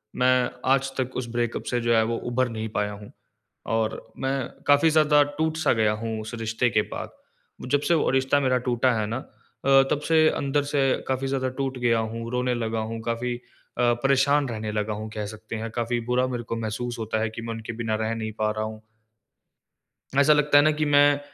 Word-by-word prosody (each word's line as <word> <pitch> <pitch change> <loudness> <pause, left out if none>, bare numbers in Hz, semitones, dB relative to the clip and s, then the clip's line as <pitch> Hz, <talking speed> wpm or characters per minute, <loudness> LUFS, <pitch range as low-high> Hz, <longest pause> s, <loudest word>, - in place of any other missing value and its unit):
मैं 125 0 +3 0.2
आज 135 0 +2
तक 130 -1 -2
उस 125 - -3
ब्रेकअप 120 0 -2
से 120 - +1
जो 120 0 +2
है 110 - +4
वो 115 0 -1
उभर 130 0 +1
नहीं 110 -1 -4
पाया 105 -1 -1
हूँ। 105 0 -11 0.6
और 110 -1 +1 0.3
मैं 135 +1 0 0.3
काफ़ी 145 +3 +5
ज़्यादा 150 -1 +5 0.2
टूट-सा 160 0 +1
गया 110 -2 +2
हूँ 110 -1 -3
उस 110 +2 -8
रिश्ते 115 +2 0
के 105 0 +2
बाद। - - -5 0.6
जब 145 0 +3
से - - +5
वो - - +2
रिश्ता 135 +2 +2
मेरा 130 -1 +2
टूटा 125 +1 +2
है 110 -2 0
ना 115 +4 -2 0.5
अ, 135 0 +6
तब 145 - +2
से 160 -1 +5
अंदर 140 +1 0
से 145 -2 +2 0.3
काफ़ी 135 0 -1
ज़्यादा 130 -1 -1
टूट 135 -1 -2
गया 120 -2 +2
हूँ, 115 +1 -4
रोने 125 0 0
लगा 115 -1 -2
हूँ, 115 +1 -4
काफ़ी 120 +2 -2
अ, - - -9 0.6
परेशान 135 +1 +3
रहने 110 -1 -4
लगा 105 0 -1
हूँ 110 +1 -6
कह 105 -1 -3
सकते 110 +1 -8
हैं, 115 +1 -4
काफ़ी 120 +1 -1
बुरा 125 +1 +2
मेरे 120 -2 -4
को 115 - -4
महसूस 115 +2 -4
होता 110 0 -2
है 110 - 0
कि 110 +1 -8
मैं 115 0 -4
उनके 115 +1 -6
बिना 115 -1 -2
रह 110 +1 -1
नहीं 110 -1 -4
पा 110 0 +1
रहा 110 0 -3
हूँ। 110 0 -8 1.4
ऐसा 145 +2 +6
लगता 150 -1 +4
है 145 - +7
ना 155 - +4
कि - - +3
मैं 145 0 +5
120 Hz, 215 wpm, -25 LUFS, 110-135 Hz, 1.4 s, है